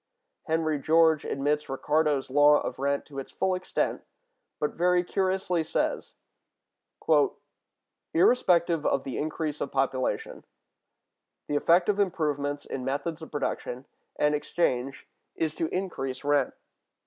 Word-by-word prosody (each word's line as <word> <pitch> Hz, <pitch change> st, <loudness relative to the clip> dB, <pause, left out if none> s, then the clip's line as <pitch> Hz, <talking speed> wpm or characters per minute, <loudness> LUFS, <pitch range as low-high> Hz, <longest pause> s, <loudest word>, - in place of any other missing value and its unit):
Henry 160 Hz, -2 st, 0 dB
George 160 Hz, +1 st, +4 dB
admits 145 Hz, +2 st, -1 dB
Ricardo's 145 Hz, 0 st, 0 dB
law 145 Hz, +1 st, +6 dB
of -, -, -5 dB
rent 140 Hz, +1 st, 0 dB
to 140 Hz, -2 st, -8 dB
its 135 Hz, -, -8 dB
full 190 Hz, -, 0 dB
extent, 185 Hz, 0 st, -2 dB, 0.6 s
but 150 Hz, -, 0 dB
very 180 Hz, +1 st, +2 dB
curiously 185 Hz, -2 st, 0 dB
says: 160 Hz, -, -2 dB, 2.0 s
"Irrespective 170 Hz, -5 st, +3 dB
of 135 Hz, -, +1 dB
the 135 Hz, -, -4 dB
increase 155 Hz, 0 st, -3 dB
of -, -, -3 dB
population, 135 Hz, -1 st, -1 dB, 1.0 s
the 145 Hz, -, -1 dB
effect 170 Hz, +4 st, +4 dB
of 205 Hz, -1 st, +1 dB
improvements 145 Hz, -7 st, -1 dB
in 130 Hz, -, -5 dB
methods 150 Hz, +5 st, -3 dB
of 160 Hz, -, -8 dB
production 135 Hz, -3 st, -3 dB, 0.3 s
and 150 Hz, 0 st, +2 dB
exchange 140 Hz, -3 st, -1 dB, 0.3 s
is 160 Hz, -2 st, -1 dB
to 165 Hz, -, -2 dB
increase 135 Hz, -9 st, -4 dB
rent.... 145 Hz, -2 st, +1 dB
150 Hz, 125 wpm, -27 LUFS, 140-170 Hz, 2.0 s, law